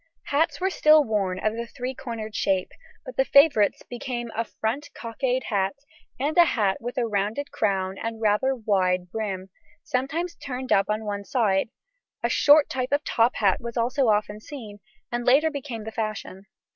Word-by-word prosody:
Hats 295 Hz, +3 st, +1 dB
were 380 Hz, +1 st, 0 dB
still 305 Hz, -3 st, +6 dB
worn 200 Hz, -6 st, -1 dB
of 215 Hz, -, +2 dB
the 235 Hz, +1 st, -5 dB
three 250 Hz, +2 st, -5 dB
cornered 230 Hz, -4 st, -6 dB
shape, 190 Hz, -1 st, 0 dB, 0.3 s
but -, -, -9 dB
the -, -, +5 dB
favourites 280 Hz, -, +4 dB
became 240 Hz, -1 st, -5 dB
a 230 Hz, -, 0 dB
front 230 Hz, +6 st, -4 dB
cockade 250 Hz, +2 st, -2 dB
hat 195 Hz, +1 st, 0 dB, 0.4 s
and 290 Hz, +4 st, -1 dB
a -, -, +10 dB
hat 205 Hz, -10 st, 0 dB
with 245 Hz, +3 st, -6 dB
a 245 Hz, -, +2 dB
rounded 215 Hz, +6 st, -2 dB
crown 195 Hz, -2 st, -1 dB
and 225 Hz, 0 st, -4 dB
rather 220 Hz, +5 st, +2 dB
wide 185 Hz, -6 st, 0 dB
brim, 190 Hz, -4 st, -4 dB, 0.3 s
sometimes 310 Hz, +8 st, -2 dB
turned 260 Hz, -3 st, -6 dB
up 195 Hz, -, +3 dB
on 215 Hz, +1 st, -1 dB
one 205 Hz, -1 st, -3 dB
side; 200 Hz, -1 st, +1 dB, 0.5 s
a -, -, +2 dB
short 295 Hz, 0 st, +6 dB
type 255 Hz, 0 st, -3 dB
of 290 Hz, +1 st, +1 dB
top 230 Hz, +2 st, +2 dB
hat 195 Hz, -3 st, +2 dB
was 235 Hz, 0 st, -6 dB
also 250 Hz, +3 st, +1 dB
often 210 Hz, 0 st, +1 dB
seen, 215 Hz, -4 st, -9 dB, 0.3 s
and 240 Hz, 0 st, -2 dB
later 285 Hz, +6 st, +4 dB
became 265 Hz, -6 st, -6 dB
the 220 Hz, -, -6 dB
fashion. 215 Hz, -3 st, -5 dB
230 Hz, 175 wpm, -25 LUFS, 210-265 Hz, 0.5 s, a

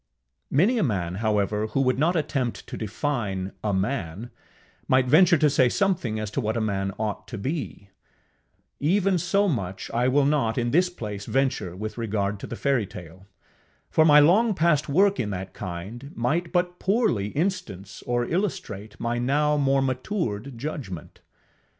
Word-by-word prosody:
Many 205 Hz, -, +3 dB
a -, -, +2 dB
man, 95 Hz, -, -1 dB
however, 105 Hz, -1 st, +1 dB
who 135 Hz, -, 0 dB
would 130 Hz, -1 st, +1 dB
not 170 Hz, +5 st, +2 dB
attempt 135 Hz, -6 st, -1 dB
to -, -, -7 dB
define 105 Hz, -4 st, -2 dB
a 105 Hz, -, 0 dB
man, 100 Hz, +1 st, -2 dB, 0.6 s
might 130 Hz, 0 st, +4 dB
venture 165 Hz, +6 st, +6 dB
to 150 Hz, -, +4 dB
say 135 Hz, -3 st, +3 dB
something 165 Hz, -, 0 dB
as 105 Hz, -1 st, -4 dB
to 135 Hz, -, -1 dB
what 110 Hz, 0 st, -1 dB
a -, -, +1 dB
man 100 Hz, -3 st, -1 dB
ought 110 Hz, -2 st, -3 dB
to 115 Hz, -, -6 dB
be: 120 Hz, -5 st, -5 dB, 0.9 s
even 185 Hz, +4 st, +2 dB
so 200 Hz, +4 st, +2 dB
much 95 Hz, -, -3 dB
I 120 Hz, +2 st, +1 dB
will 140 Hz, +2 st, +3 dB
not 140 Hz, -6 st, +1 dB
in 120 Hz, -1 st, 0 dB
this 180 Hz, +5 st, +3 dB
place 105 Hz, -, -7 dB
venture 130 Hz, -9 st, 0 dB
with 110 Hz, +4 st, -6 dB
regard 105 Hz, -2 st, -1 dB
to -, -, -7 dB
the -, -, -5 dB
fairytale, 95 Hz, -, -3 dB, 0.6 s
for 160 Hz, -, +5 dB
my 150 Hz, -2 st, +7 dB
long 200 Hz, +9 st, +4 dB
past 155 Hz, -3 st, +2 dB
work 195 Hz, +7 st, +3 dB
in 105 Hz, -, -1 dB
that 95 Hz, -1 st, -5 dB
kind 105 Hz, +9 st, -7 dB
might 160 Hz, +9 st, -1 dB
but 180 Hz, 0 st, 0 dB
poorly 195 Hz, -, +1 dB
instance 145 Hz, -, -3 dB
or 120 Hz, 0 st, +1 dB
illustrate 110 Hz, -, -3 dB
my 120 Hz, +1 st, -1 dB
now 150 Hz, +4 st, +2 dB
more 135 Hz, -1 st, +2 dB
matured 130 Hz, -, -3 dB
judgment. 115 Hz, -, -6 dB
125 Hz, 160 wpm, -25 LUFS, 105-155 Hz, 0.9 s, my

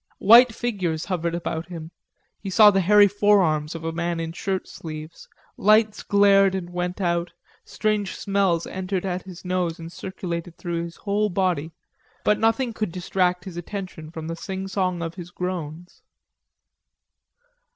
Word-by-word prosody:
White 235 Hz, +4 st, +7 dB
figures 185 Hz, -10 st, -2 dB
hovered 170 Hz, -3 st, -2 dB
about 170 Hz, -1 st, -4 dB
him, 165 Hz, -2 st, -8 dB, 0.5 s
he 195 Hz, -, -6 dB
saw 210 Hz, +2 st, +7 dB
the 195 Hz, -1 st, +2 dB
hairy 205 Hz, +3 st, +6 dB
forearms 190 Hz, -7 st, +2 dB
of 165 Hz, -, -7 dB
a 165 Hz, -, -2 dB
man 170 Hz, 0 st, -2 dB
in 165 Hz, 0 st, -3 dB
shirt 190 Hz, +2 st, -3 dB
sleeves, 155 Hz, 0 st, -9 dB, 0.3 s
lights 215 Hz, +1 st, +3 dB
glared 195 Hz, -1 st, +4 dB
and 175 Hz, -2 st, -5 dB
went 180 Hz, +1 st, -3 dB
out, 170 Hz, -2 st, 0 dB, 0.3 s
strange 210 Hz, -3 st, -1 dB
smells 195 Hz, -4 st, +1 dB
entered 190 Hz, 0 st, -3 dB
at 185 Hz, -1 st, -2 dB
his 185 Hz, -1 st, -12 dB
nose 180 Hz, -2 st, -1 dB
and 165 Hz, 0 st, -9 dB
circulated 175 Hz, -2 st, -6 dB
through 170 Hz, -1 st, -3 dB
his 170 Hz, -, -9 dB
whole 210 Hz, +1 st, 0 dB
body, 180 Hz, -5 st, 0 dB, 0.5 s
but 210 Hz, 0 st, +2 dB
nothing 225 Hz, +2 st, +1 dB
could 215 Hz, -4 st, -3 dB
distract 180 Hz, 0 st, 0 dB
his 180 Hz, -3 st, -8 dB
attention 175 Hz, -3 st, -6 dB
from 160 Hz, -1 st, -7 dB
the 165 Hz, -, -3 dB
singsong 190 Hz, -1 st, -3 dB
of 165 Hz, 0 st, -4 dB
his 175 Hz, -1 st, -9 dB
groans. 175 Hz, -2 st, -6 dB
180 Hz, 150 wpm, -24 LUFS, 170-200 Hz, 0.5 s, White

